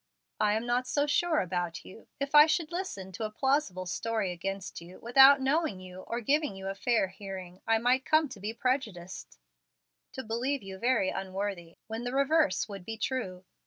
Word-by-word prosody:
"I 210 -1 +3
am 220 +2 -1
not 245 +1 0
so 285 +2 +1
sure 310 +2 +2
about 175 -2 -3
you. 220 - -13
If 280 +1 -3
I 300 +1 +9
should 325 0 0
listen 340 - -5
to 220 +4 -6
a 215 - -1
plausible 215 -6 0
story 205 +3 -2
against 190 +1 -5
you, 175 +2 -12
without 270 +4 +7
knowing 270 - 0
you 185 0 -10
or 235 +1 -3
giving 290 -1 +1
you 195 0 -5
a - - -2
fair 205 0 +1
hearing, 190 -2 -9
I 225 0 +4
might 250 +3 +2
come 310 +1 +3
to 220 - -10
be 210 +3 -3
prejudiced, 225 -8 -3 0.8
to 265 - -5
believe 245 +4 -2
you 190 -1 -8
very 230 -5 +2
unworthy, 190 -3 -4
when 225 +2 -5
the 245 +1 -3
reverse 275 - +2
would 200 -3 -8
be 225 +4 -6
true. 200 -6 -3
225 Hz, 190 wpm, -30 LUFS, 190-265 Hz, 0.8 s, I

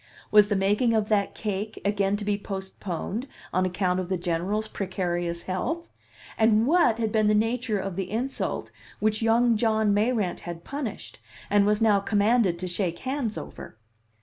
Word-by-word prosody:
Was 210 -1 +7
the 205 - 0
making 205 +5 +2
of 215 -1 +1
that 205 -2 +1
cake 210 0 -3
again 200 0 +1
to 205 - -6
be 205 0 +1
postponed 195 - -5 0.3
on 185 +1 +2
account 180 0 0
of 185 -1 -4
the 190 - 0
General's 180 +5 -1
precarious 175 -4 -3
health? 320 - -3 0.5
And 220 0 +4
what 305 -6 +4
had 220 -2 -1
been 215 -1 +2
the 210 - +4
nature 225 0 0
of 195 -2 -4
the 190 -1 -3
insult 250 +5 -3 0.3
which 215 +1 +1
young 230 +1 +3
John 220 -2 +2
Mayrant 210 -3 +1
had 170 -1 -7
punished 270 -5 -6 0.3
and 205 0 +4
was 210 +1 +2
now 210 -3 +5
commanded 205 -2 +2
to 185 +1 -4
shake 175 -1 -2
hands 260 -4 -3
over? - - -9
210 Hz, 170 wpm, -26 LUFS, 190-225 Hz, 0.5 s, Was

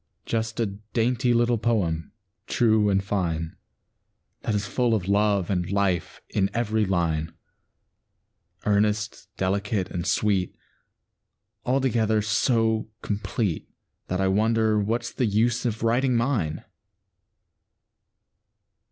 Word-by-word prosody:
Just 115 0 -2
a 115 - +2
dainty 115 +5 -1
little 120 -1 +2
poem, 95 -9 0 0.4
true 110 -3 +3
and 95 -1 +2
fine, 85 -5 -2 0.9
That 110 - -1
is 105 0 -1
full 120 +1 +1
of 95 -4 -2
love 100 -2 +2
and 90 -1 -1
life 95 -4 0
in 100 -1 +1
every 110 -2 +1
line, 85 -4 0 1.3
Earnest, 105 +1 0
delicate, 100 +1 -1
and 90 0 -3
sweet, 100 -4 +1 1.1
Altogether 120 -5 +2
so 110 0 +1
complete 105 -2 -2 0.4
That 90 - -2
I 95 - +2
wonder 110 +2 +2
what's 115 +3 -1
the 125 - +1
use 115 +4 +1
of 115 -1 -3
writing 125 +3 +2
mine. 115 - -1
105 Hz, 110 wpm, -25 LUFS, 95-115 Hz, 1.3 s, true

